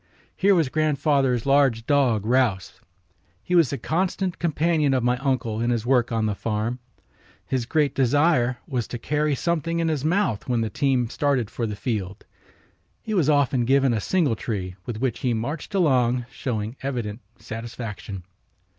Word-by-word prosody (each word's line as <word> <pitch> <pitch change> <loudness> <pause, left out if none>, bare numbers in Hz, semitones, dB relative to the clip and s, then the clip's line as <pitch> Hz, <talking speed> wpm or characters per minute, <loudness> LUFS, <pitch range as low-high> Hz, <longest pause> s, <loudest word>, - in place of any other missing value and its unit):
Here 195 0 +4
was 165 -5 +2
grandfather's 140 -5 +1
large 135 -5 +3
dog 125 -8 +2
Rouse. 115 -7 0 0.6
He 180 - -4
was 165 -7 +5
the 140 - -3
constant 185 +3 -1
companion 155 -3 +1
of 125 - 0
my 125 +1 +2
uncle 125 -5 -1
in 120 - +1
his 120 -2 0
work 125 -2 +2
on 115 -1 0
the 105 - 0
farm. 110 +4 -2 0.7
His 125 -3 -2
great 150 -1 +1
desire 130 -1 +2
was 125 -5 -2
to 120 - -5
carry 150 +3 0
something 170 +2 -1
in 165 -1 +1
his 150 -4 -1
mouth 160 - 0
when 120 -2 +1
the 110 -2 -2
team 130 -2 +1
started 135 -7 0
for 115 - -2
the 105 - -4
field. 100 -5 -4 0.8
He 220 - -4
was 170 -7 +2
often 140 -4 +3
given 135 0 +3
a 110 - -1
singletree, 115 - -1
with 115 - -4
which 125 -1 -1
he 125 -3 0
marched 145 - -4
along, 125 -8 +2
showing 115 -2 -4
evident 120 -5 -4 0.2
satisfaction. 115 -4 -7
130 Hz, 165 wpm, -24 LUFS, 115-150 Hz, 0.8 s, was